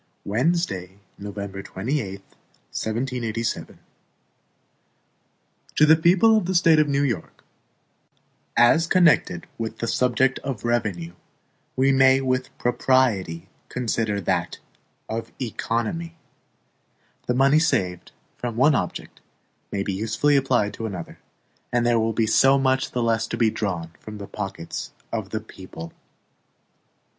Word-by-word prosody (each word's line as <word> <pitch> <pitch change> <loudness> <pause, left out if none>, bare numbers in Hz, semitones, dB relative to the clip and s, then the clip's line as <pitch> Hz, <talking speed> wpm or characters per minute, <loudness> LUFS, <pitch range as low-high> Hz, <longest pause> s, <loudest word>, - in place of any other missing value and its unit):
Wednesday, 105 - -1 0.2
November 100 -1 -6
28, 100 0 -3 0.5
1787 115 -1 -2
HAMILTON - - -20 1.9
To 150 - +6
the 155 +1 +7
People 180 +7 +5
of 210 -5 +1
the 190 - -1
State 165 -2 +5
of 150 -1 +3
New 140 0 +2
York: 120 - -3 1.1
As 140 +8 +5
CONNECTED 175 0 +3
with 110 0 -4
the 115 - -3
subject 125 +2 +2
of 130 -7 -5
revenue, 100 -8 -1 0.6
we 135 +1 +3
may 135 0 +5
with 130 -1 -1
propriety 120 -9 +1 0.2
consider 115 -4 -1
that 95 - -1 0.5
of 115 +1 -4
economy. 125 +7 -3 1.1
The 125 - +1
money 135 +4 +5
saved 90 - 0 0.3
from 120 -2 -3
one 140 +6 +4
object - - -3 0.5
may 100 -1 -1
be 100 - -2
usefully 110 +9 +1
applied 130 -6 +2
to 115 - -4
another, 90 -5 -7 0.5
and 120 -1 +1
there 120 -1 +3
will 115 0 +1
be 110 +1 +1
so 135 +5 +5
much 130 -1 +1
the 125 - -2
less 115 -1 +1
to 115 - -4
be 115 -2 +3
drawn 90 -7 -3
from 110 -1 -9
the 100 - -7
pockets 95 -4 -6 0.2
of 110 -4 -3
the 110 +1 -3
people. 95 -5 -10
120 Hz, 130 wpm, -24 LUFS, 105-135 Hz, 1.9 s, the